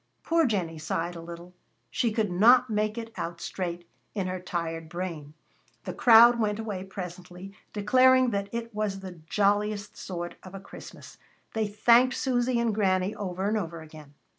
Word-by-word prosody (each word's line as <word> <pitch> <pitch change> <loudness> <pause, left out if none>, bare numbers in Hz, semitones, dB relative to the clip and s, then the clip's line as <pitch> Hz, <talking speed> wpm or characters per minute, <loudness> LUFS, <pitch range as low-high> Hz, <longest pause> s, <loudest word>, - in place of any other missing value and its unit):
Poor 330 -3 +2
Jennie 175 -8 -2
sighed 165 +3 -3
a 165 - -7
little. 170 +1 -10 0.4
She 235 - 0
could 215 -3 -1
not 240 +6 +5
make 215 +1 0
it 230 -1 -6
out 170 0 -5
straight 175 -2 -5 0.3
in 195 -3 -1
her 185 0 -3
tired 165 -2 -4
brain. 165 -4 -6 0.5
The - - -5
crowd 235 0 +7
went 210 -2 0
away 210 -4 -4
presently, 180 0 -8 0.2
declaring 255 +4 +4
that 200 -1 -2
it 230 0 -5
was 205 -2 -2
the 185 -3 -9
jolliest 205 0 0
sort 175 -2 -6
of 185 +1 -11
a - - -6
Christmas. 195 - -12 0.3
They 220 -1 0
thanked 235 +5 +4
Susy 245 -2 0
and 235 -2 +1
Granny 190 -1 +1
over 195 -2 -3
and 215 - 0
over 170 -5 -4
again. 155 -2 -14
200 Hz, 165 wpm, -27 LUFS, 175-225 Hz, 0.5 s, crowd